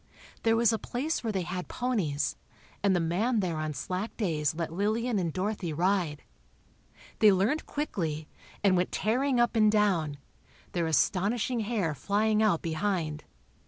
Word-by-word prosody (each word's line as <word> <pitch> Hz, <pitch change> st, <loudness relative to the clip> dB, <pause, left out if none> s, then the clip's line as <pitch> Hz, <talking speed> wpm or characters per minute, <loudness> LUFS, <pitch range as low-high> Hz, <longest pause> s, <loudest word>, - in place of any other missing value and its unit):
There 225 Hz, 0 st, +3 dB
was 230 Hz, 0 st, +4 dB
a 220 Hz, -, -1 dB
place 285 Hz, +6 st, -2 dB
where 225 Hz, -, -1 dB
they 190 Hz, -3 st, -1 dB
had 180 Hz, +1 st, -4 dB
ponies, 200 Hz, -, -1 dB, 0.5 s
and 195 Hz, -2 st, +3 dB
the -, -, +2 dB
man 200 Hz, +9 st, +1 dB
there 175 Hz, -5 st, -1 dB
on 155 Hz, -1 st, -3 dB
slack 185 Hz, -, -4 dB
days 155 Hz, -8 st, 0 dB
let 165 Hz, -1 st, -3 dB
Lillian 215 Hz, +4 st, 0 dB
and 170 Hz, -3 st, -1 dB
Dorothy 185 Hz, -2 st, -2 dB
ride. 175 Hz, -2 st, 0 dB, 1.0 s
They 215 Hz, -2 st, +7 dB
learned 205 Hz, +11 st, +1 dB
quickly, 160 Hz, -, -3 dB, 0.4 s
and 195 Hz, -2 st, +5 dB
went 180 Hz, 0 st, +1 dB
tearing 250 Hz, +4 st, +1 dB
up 240 Hz, 0 st, +2 dB
and 215 Hz, -1 st, +5 dB
down, 180 Hz, -9 st, +2 dB, 0.5 s
their 170 Hz, -2 st, 0 dB
astonishing 210 Hz, -, +1 dB
hair 210 Hz, -7 st, -1 dB
flying 210 Hz, -, +1 dB
out 210 Hz, -7 st, +2 dB
behind. 160 Hz, -2 st, -2 dB
195 Hz, 155 wpm, -29 LUFS, 165-220 Hz, 1.0 s, They